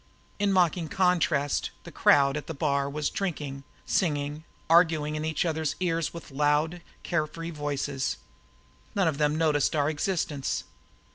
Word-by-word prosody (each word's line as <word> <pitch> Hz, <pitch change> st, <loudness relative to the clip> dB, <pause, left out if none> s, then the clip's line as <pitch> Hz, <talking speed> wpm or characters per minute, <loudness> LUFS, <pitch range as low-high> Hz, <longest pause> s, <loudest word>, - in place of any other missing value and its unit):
In 205 Hz, -1 st, +2 dB
mocking 175 Hz, -3 st, +2 dB
contrast 170 Hz, -6 st, +1 dB
the -, -, -10 dB
crowd 140 Hz, -1 st, +4 dB
at 150 Hz, -, -5 dB
the 165 Hz, -, -5 dB
bar 140 Hz, -1 st, 0 dB
were 150 Hz, +2 st, -5 dB
drinking, 145 Hz, -5 st, -3 dB, 0.2 s
singing, 150 Hz, -2 st, -1 dB, 0.2 s
arguing 160 Hz, -3 st, +4 dB
in 155 Hz, -, -3 dB
each 160 Hz, +2 st, 0 dB
other's 160 Hz, -2 st, -1 dB
ears 165 Hz, -3 st, 0 dB
with 170 Hz, -3 st, -10 dB
loud, 150 Hz, +4 st, +1 dB, 0.2 s
care 155 Hz, -3 st, 0 dB
free 165 Hz, +2 st, -7 dB
voices. 145 Hz, -3 st, -2 dB, 0.8 s
None 195 Hz, -4 st, +3 dB
of 155 Hz, -3 st, -1 dB
them 150 Hz, 0 st, +2 dB
noticed 155 Hz, -2 st, +2 dB
our 145 Hz, 0 st, +2 dB
existence. 150 Hz, -3 st, -1 dB
155 Hz, 145 wpm, -27 LUFS, 145-165 Hz, 0.8 s, crowd